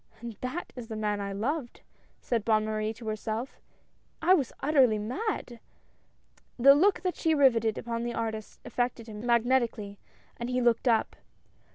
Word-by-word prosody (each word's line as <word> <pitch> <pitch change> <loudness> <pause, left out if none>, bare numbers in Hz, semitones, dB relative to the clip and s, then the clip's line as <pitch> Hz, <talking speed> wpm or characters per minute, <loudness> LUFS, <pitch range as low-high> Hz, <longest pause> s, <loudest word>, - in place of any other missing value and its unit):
"And 235 0 -7
that 255 +8 -5
is 245 -3 -7
the 220 - -6
man 210 -1 -1
I 200 0 -4
loved," 240 +6 -3 0.4
said 230 -4 -1
Bonne 215 -1 +2
Marie 215 0 -1
to 225 0 -10
herself. 220 +3 -4 0.6
"I 350 +3 +5
was 285 -10 +1
utterly 270 -7 +4
mad!" 245 - -3 1.0
The 275 +3 +8
look 370 +8 +3
that 365 -1 -1
she 320 -2 +1
riveted 230 -6 +3
upon 230 -1 -3
the 240 0 -3
artist 220 -2 -4
affected 245 -2 -2
him 215 -1 -8
magnetically, 235 -4 +1 0.4
and 235 +1 -4
he 250 0 0
looked 240 +1 +2
up. 225 -2 +2
235 Hz, 160 wpm, -28 LUFS, 220-260 Hz, 1.0 s, The